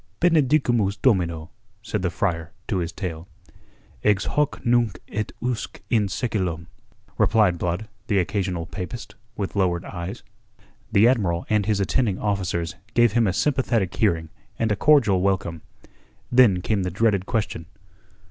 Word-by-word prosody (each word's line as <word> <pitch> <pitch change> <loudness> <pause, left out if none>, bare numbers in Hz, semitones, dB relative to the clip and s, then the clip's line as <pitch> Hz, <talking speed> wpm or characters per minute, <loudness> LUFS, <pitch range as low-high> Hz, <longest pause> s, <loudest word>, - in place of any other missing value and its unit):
"Benedicamus 135 - +3
Domino," 85 -10 +1 0.3
said 105 -3 -2
the 90 - 0
friar 85 -3 -2 0.2
to 100 - 0
his 85 -1 -2
tale. 85 -3 -6 0.8
"Ex 100 -2 +2
hoc 150 -2 -1
nunc 120 -5 +2
et 105 +1 -3
usque 125 -2 -3
in 110 -4 +3
seculum," 90 -5 -2 0.5
replied 105 -6 +3
Blood, 90 +5 -2 0.2
the 105 - +1
occasional 90 -2 -1
papist, 105 +5 -7 0.2
with 100 -1 -3
lowered 90 -3 +1
eyes. 90 +5 -6 0.7
The 105 +3 +5
Admiral 95 -9 +1
and 105 -1 +2
his 105 -2 +1
attending 100 0 +1
officers 90 -5 -1 0.2
gave 120 -2 +5
him 115 0 +2
a - - +2
sympathetic 120 -4 0
hearing 85 -7 +1 0.3
and 115 -1 0
a - - +2
cordial 110 -8 +4
welcome. 90 -4 -1 0.7
Then 120 -8 +5
came 105 -3 0
the 90 - -1
dreaded 100 0 +1
question. 105 -8 -2
100 Hz, 140 wpm, -24 LUFS, 90-115 Hz, 0.8 s, The